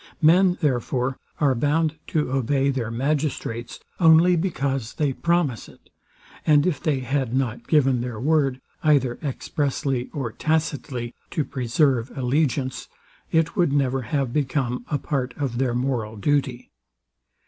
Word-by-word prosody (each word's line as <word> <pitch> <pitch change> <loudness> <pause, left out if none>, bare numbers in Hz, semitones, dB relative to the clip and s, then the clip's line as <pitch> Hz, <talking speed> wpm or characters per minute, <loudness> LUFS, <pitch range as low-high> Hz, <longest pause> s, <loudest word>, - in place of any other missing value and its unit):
Men, 180 +3 +5
therefore, 130 -2 0 0.2
are 145 -4 +3
bound 155 +5 0
to 150 -5 -1
obey 135 +1 +1
their 125 -4 -2
magistrates, 130 -2 -2 0.2
only 165 +1 +6
because 140 - -2
they 145 -3 0
promise 170 -6 0
it; - - -21 0.5
and 150 -2 +4
if 175 -7 0
they 150 -6 0
had 130 -1 -1
not 125 -3 -2
given 135 -5 +3
their 120 -3 -5
word, 140 -1 +1 0.2
either 135 -5 +2
expressly 135 -3 -2
or 135 -7 -3
tacitly, 145 -5 -2 0.2
to 150 - -1
preserve 130 -1 +1
allegiance, 130 -1 0 0.4
it 160 0 +1
would 175 -7 +2
never 135 -2 +1
have 130 +1 -2
become 130 -4 -1
a 145 - +1
part 135 -3 -3
of 130 -4 -2
their 125 -3 +1
moral 120 -4 -1
duty. 135 +1 -1
135 Hz, 135 wpm, -24 LUFS, 125-150 Hz, 0.5 s, only